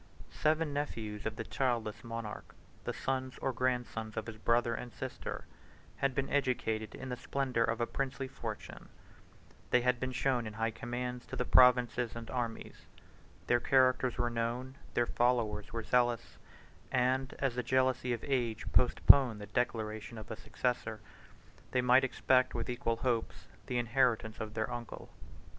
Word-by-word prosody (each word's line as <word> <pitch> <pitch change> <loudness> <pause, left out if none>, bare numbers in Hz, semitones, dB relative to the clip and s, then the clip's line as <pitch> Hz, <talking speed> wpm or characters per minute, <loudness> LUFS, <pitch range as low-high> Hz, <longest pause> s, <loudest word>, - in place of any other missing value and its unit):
Seven 155 -1 +1
nephews 110 -8 -4
1 - - +2
of 110 - -4
the 115 - -4
childless 115 -5 -1
monarch, 115 -2 -6 0.3
the - - -1
sons 130 0 -3
or 135 - -1
grandsons 120 -3 -2
of 110 - -2
his 115 -1 -7
brother 115 +1 +2
and 120 +1 -5
sister, - - -6 0.5
had 135 +2 0
been 135 -1 0
educated 115 -6 0
in 130 - -7
the 125 - -2
splendor 130 -2 0
of 115 0 0
a 120 - +2
princely 135 +1 -3
fortune; 135 - -7 0.8
they 125 - +4
had 125 0 +2
been 130 0 -2
shown 125 -2 0
in 110 - -6
high 115 +1 -1
commands 125 +2 -4
to - - -6
the 125 - -1
provinces 125 -2 +5
and 115 -1 -7
armies; 120 -3 -4 0.6
their 120 - +3
characters 130 -1 +3
were 120 0 0
known, 120 +3 -2 0.2
their 120 - +3
followers 120 -4 +1
were 115 -1 -3
zealous, 120 -1 +1 0.5
and, 130 +1 +1
as 135 -3 0
the 125 - -1
jealousy 130 0 +1
of 120 -2 -2
age 120 -5 -1
postponed 125 -2 +6
the 105 - -6
declaration 110 +1 -2
of 110 -2 -8
a - - -3
successor, 115 -2 -2 0.7
they 125 - +3
might 125 +1 +5
expect 130 0 +2
with 120 +1 -2
equal 115 -1 -1
hopes 115 -1 -2 0.2
the 125 - -1
inheritance 115 -2 +1
of 110 -1 -5
their 110 +2 -1
uncle. 120 -1 -7
120 Hz, 160 wpm, -33 LUFS, 115-130 Hz, 0.8 s, postponed